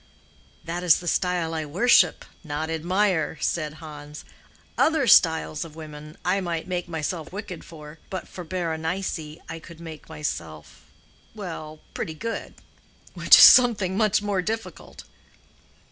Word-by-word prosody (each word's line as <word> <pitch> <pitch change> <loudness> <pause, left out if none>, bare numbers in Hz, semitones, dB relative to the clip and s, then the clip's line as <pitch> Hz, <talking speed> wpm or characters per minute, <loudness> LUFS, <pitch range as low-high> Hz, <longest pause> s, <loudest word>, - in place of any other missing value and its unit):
"That 170 +1 -4
is 175 -3 +5
the 175 - -9
style 175 -2 0
I 160 -1 -2
worship—not 160 -3 +1
admire," 175 0 0
said 155 -2 -2
Hans. 150 -1 -10 0.5
"Other 315 -3 +2
styles 160 -7 +4
of 160 -2 -12
women 155 -1 -10
I 190 +2 +1
might 170 -3 -3
make 180 -1 -3
myself 160 0 -4
wicked 195 -3 -7
for, 150 -1 -12
but 185 -2 -5
for 180 - -9
Berenice 170 +1 -3 0.3
I 165 - -7
could 165 +1 -13
make 160 -3 -10
myself—well, 155 - -8
pretty 160 - -4
good, 230 +7 -5 0.6
which - - +7
is - - +9
something 210 -7 +7
much 210 -1 +2
more 200 -3 0
difficult." 215 -2 -6
165 Hz, 130 wpm, -24 LUFS, 155-185 Hz, 0.6 s, is